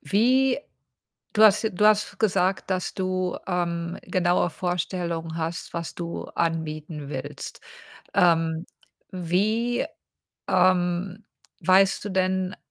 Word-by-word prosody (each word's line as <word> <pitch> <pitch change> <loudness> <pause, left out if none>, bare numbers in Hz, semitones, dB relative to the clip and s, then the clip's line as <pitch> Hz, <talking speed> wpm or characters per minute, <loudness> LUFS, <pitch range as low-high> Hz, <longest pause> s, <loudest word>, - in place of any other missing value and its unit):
wie 255 +5 +3 0.7
du 220 - +3
hast 210 0 +6
j 220 - +1
du 210 +4 +4
hast 210 -2 +2
gesagt, 190 -2 +1
dass 185 -1 -1
du, 185 -1 -1
ähm, 170 -1 -2
genaue 180 -1 +1
Vorstellungen 170 -1 -3
hast, 165 0 -4
was 170 -1 -4
du 170 -1 -5
anbieten 155 -2 -2
willst. 140 +1 -6 0.5
Ähm, 165 -2 +3 0.5
wie 210 +7 0 0.6
ähm, 180 +2 +2 0.4
weißt 190 +2 +4
du - - -3
denn, 185 0 0
180 Hz, 110 wpm, -25 LUFS, 170-195 Hz, 0.7 s, hast